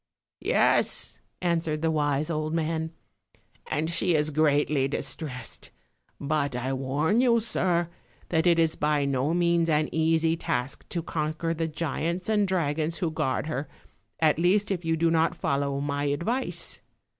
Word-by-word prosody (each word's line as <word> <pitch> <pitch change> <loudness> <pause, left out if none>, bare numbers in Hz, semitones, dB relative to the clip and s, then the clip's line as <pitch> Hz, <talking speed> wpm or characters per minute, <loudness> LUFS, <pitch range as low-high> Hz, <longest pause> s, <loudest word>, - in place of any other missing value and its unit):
" - - -67 0.2
Yes, - - +2 0.2
"answered 165 -3 0
the 160 - +2
wise 150 0 0
old 155 0 -2
man; 160 0 -1 0.8
"and 155 +2 -1
she 170 0 +1
is 150 0 +1
greatly 145 -2 +2
distressed; 135 -2 -4 0.5
but 145 -2 -1
I 130 +2 -2
warn 140 - +1
you, 235 -2 +4
sir, 180 -6 +1 0.4
that 160 0 +2
it 170 -1 +5
is 165 -1 +2
by 150 -1 +1
no 140 +4 0
means 170 -1 +2
an 155 0 +2
easy 160 0 +2
task 125 -5 -3
to 170 -2 -3
conquer 160 +1 -2
the 165 0 -2
giants 165 +4 -2
and 210 -2 +3
dragons 165 -2 0
who 170 -4 -1
guard 135 -3 -1
her, 150 -2 -3 0.5
at 155 -1 +3
least 200 +4 +2
if 180 -2 -2
you 165 0 0
do 165 +1 +2
not 165 +1 +2
follow 140 0 -1
my 145 0 -2
advice. 170 - -1
160 Hz, 155 wpm, -27 LUFS, 145-170 Hz, 0.8 s, it